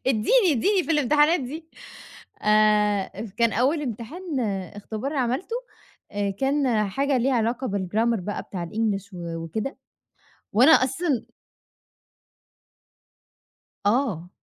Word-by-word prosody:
إديني 305 - +3
إديني 375 - +2
في - - -6
الامتحانات 300 +2 +3
دي 310 +6 -7 0.7
آآ، 210 -1 +3 0.3
كان 230 -2 +3
أول 275 +7 +2
امتحان، 280 - -4 0.4
اختبار 220 +7 -5
عملته 270 - -1 0.6
آآ، 205 -1 -1
كان 255 -2 +1
حاجة 275 +5 +1
ليها 260 +2 +1
علاقة 240 +3 0
بال 195 -2 -2
Grammer 230 -1 +2
بقى 205 +3 -4
بتاع 180 -3 -5
الEnglish 200 0 -2
و 170 -2 -5
وكده 220 - -4 0.8
وأنا 250 +8 +6
أصلًا 270 0 +2 2.6
آه، 205 - +1
235 Hz, 110 wpm, -24 LUFS, 210-285 Hz, 2.6 s, وأنا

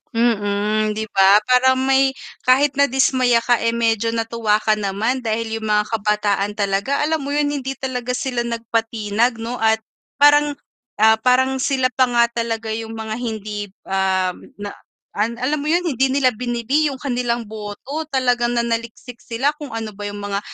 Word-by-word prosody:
Mm. 215 -3 0
'Di 215 +1 -3
ba, 195 +1 +7
parang 260 +1 +4
may 270 0 +3 0.3
kahit 270 +3 +4
nadismaya 260 -3 +3
ka, 240 0 +1
eh, 230 - +2
medyo 230 -1 +1
natuwa 225 -2 0
ka 215 0 +2
naman 215 +5 -2
dahil 225 0 -2
yung 220 - -4
mga 210 0 +2
kabataan 210 -2 0
talaga, 200 +6 -1
alam 315 0 0
mo 280 - -4
yun 295 0 +1
hindi 270 -2 -3
talaga 250 -2 -3
sila 250 -1 -2
nagpatinag 230 0 -1
'no, 230 +2 -4
at 220 -2 +2 0.4
parang, 290 0 +6 0.5
ah, 220 +1 +6
parang 255 +3 +2
sila 260 -2 +2
pa 255 -1 +3
nga 235 0 +4
talaga 230 -1 -3
yung 225 0 -6
mga 220 -1 -5
hindi, 210 -3 -4 0.2
ah, 190 -1 0 0.2
na 205 0 -6 0.4
alam 235 +7 -1
mo - - -4
yun 350 +2 +2
hindi 265 -3 +1
nila 265 -2 +3
bini-bili 245 +5 0
yung - - -6
kanilang 245 -3 -1
boto 220 +8 -6
talagang 245 -2 +1
nanaliksik 235 +1 -3
sila 250 +5 -1
kung 295 -3 -7
ano 225 -1 -4
ba 205 0 -5
yung 205 0 -6
mga 200 0 -2
235 Hz, 165 wpm, -20 LUFS, 215-260 Hz, 0.5 s, ba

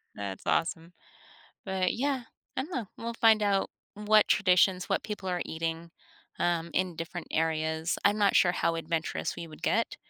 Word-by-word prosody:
That's 100 -2 -6
awesome. 165 +1 -1 0.7
But 190 -2 0
yeah, 265 -1 -1 0.3
I - - +1
don't 315 - -9
know, 235 -6 -2
we'll 230 0 -5
find 225 -2 +5
out 200 -1 +1 0.2
what 210 0 +4
traditions, 185 -1 +3
what - - 0
people 205 -3 -5
are 180 -1 -1
eating, 165 +1 -4 0.5
um, 170 -1 0
in 185 -3 -1
different 165 +1 -6
areas. 160 +1 0
I'm 205 +1 +4
not 200 -2 +4
sure 175 -1 +5
how 165 -1 0
adventurous 165 +1 -2
we 170 -1 -6
would 155 - -13
get 230 +1 +1
180 Hz, 165 wpm, -29 LUFS, 165-210 Hz, 0.7 s, find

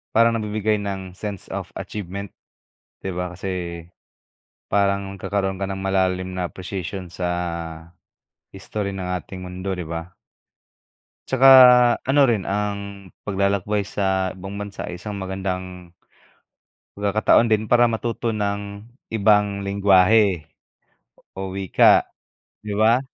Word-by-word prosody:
parang 115 +1 +5
nabibigay 105 -1 0
ng 95 -2 -5
sense 100 -3 -6
of - - -5
achievement 100 -1 -6 0.7
'di 95 - -4
ba 90 0 -4
kasi, 90 -3 -5 0.9
parang 100 -1 +1
nagkakaroon 95 -1 -2
ka 95 - -1
ng 95 - -4
malalim 95 -1 0
na 90 -1 -2
presisyon 95 -1 -6
sa, 85 -2 -4 0.6
history 100 +1 -4
ng 95 -2 -5
ating 95 +3 -10
mundo 90 +2 -5
'di 90 -3 -4
ba? 85 +2 -6 1.2
Tsaka 130 0 +4 0.6
ano 140 +1 +5
rin 115 -7 +1
ang 100 -1 -4 0.2
paglalakbay 100 +1 0
sa 95 -1 -1
ibang 95 +2 -8
bansa 100 0 -6
ay 90 - -5
isang 100 +2 -6
magandang 95 -2 -5 1.1
pagkakataon 105 +3 +3
din 110 -1 +1
para 120 0 +5
matuto 115 0 -2
ng 100 -1 -3 0.3
ibang 105 -1 +3
lenggwahe 100 -2 +3 0.9
o 95 -1 -4
wika 95 -1 +4 0.6
'di 105 -1 -5
ba? 110 +3 +4
100 Hz, 115 wpm, -22 LUFS, 95-105 Hz, 1.2 s, parang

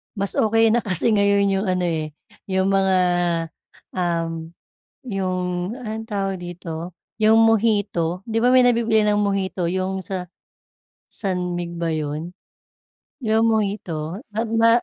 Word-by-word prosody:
Mas 200 -1 -1
okey 225 +1 +4
na 240 - +3
kasi 205 +1 0
ngayon 200 -1 +3
'yong 195 +1 0
ano, 185 -1 0
eh, 160 -3 -2 0.3
'yong 190 0 +1
mga, 190 -1 +3 1.0
um, 165 -2 -2 0.5
'yong 185 -2 -2
anong 220 -2 -5
tawag 195 -2 -1
dito, 175 -1 -6 0.3
'yong 220 +1 +6
mojito. 205 -6 +2
'Di 225 0 -1
ba 245 - +5
may 255 -1 +6
nabibili 230 -3 +3
ng 210 0 +2
mojito 195 -3 -1
'yong 190 +1 -2
sa, 180 0 -5 0.8
San 180 -3 -2
Mig 170 0 -5
ba 170 -1 -1
'yon? 155 +2 -3 0.9
'Yong 220 -1 +2
mojito 195 -6 -1
ma 220 - 0 0.2
ma 230 0 +5
190 Hz, 135 wpm, -22 LUFS, 175-215 Hz, 1.0 s, yong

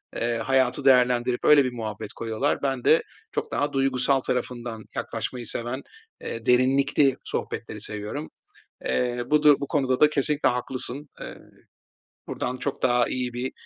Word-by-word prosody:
eee, 115 0 -1
hayatı 130 +3 +1
değerlendirip 125 -1 +3
öyle 145 -2 +7
bir 125 - -1
muhabbet 110 -2 -6
koyuyorlar. 115 +5 -1
Ben 135 -3 -1
de - - +5 0.3
çok - - -3
daha 145 0 -1
duygusal 135 0 +2
tarafından 120 -3 -4
yaklaşmayı 120 -3 -4
seven, 120 +4 -3 0.4
eee, 115 -1 -6
derinlikli 135 +2 +3
sohbetleri - - -5
seviyorum. 105 +9 -5 0.6
Eee, 120 -1 0
bu 150 0 +3
du 150 -2 +7
bu 140 - -4
konuda 130 -3 0
da 150 - +6
kesinlikle 150 0 +1
haklısın. 130 +3 -3
Eee, - - -7 0.9
buradan 125 +1 -3
çok 140 +1 -4
daha 120 -1 +3
iyi 125 -1 -3
bir, 125 +2 -3
125 Hz, 145 wpm, -25 LUFS, 120-135 Hz, 0.9 s, öyle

